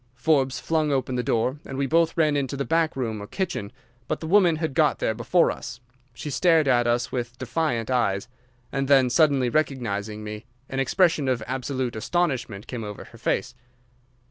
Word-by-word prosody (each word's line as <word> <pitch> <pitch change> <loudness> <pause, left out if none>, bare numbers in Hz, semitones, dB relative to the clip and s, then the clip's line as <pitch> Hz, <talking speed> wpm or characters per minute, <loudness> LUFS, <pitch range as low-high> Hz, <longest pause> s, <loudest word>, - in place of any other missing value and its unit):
Forbes 135 -1 +1
flung 155 -2 0
open 130 -1 0
the 125 - 0
door, 120 +4 0
and 135 - -7
we 140 - +1
both 165 +4 +2
ran 155 -3 +3
into 140 -1 -1
the 140 - -2
back 165 -1 +1
room 115 -5 -3
or 105 - -7
kitchen, 175 - -3 0.4
but 155 - -2
the - - -6
woman 175 -1 +4
had 155 -2 -2
got 155 -1 +3
there 110 - 0
before 120 +10 +2
us. 125 -4 -7 0.4
She 145 +5 -6
stared 165 0 +3
at 120 -2 +3
us 120 0 0
with 120 -1 -4
defiant 130 -2 -1
eyes, 100 -6 +1 0.4
and 135 0 -1
then, 135 -3 +5
suddenly 140 -4 +3
recognising 110 -7 -2
me, 105 +1 -7 0.2
an 135 - -3
expression 150 +1 +2
of 125 -4 0
absolute 130 -1 -3
astonishment 120 - -1
came 120 -3 -5
over 105 -1 -7
her 115 - -16
face. 125 +3 -1
130 Hz, 185 wpm, -25 LUFS, 120-155 Hz, 0.4 s, then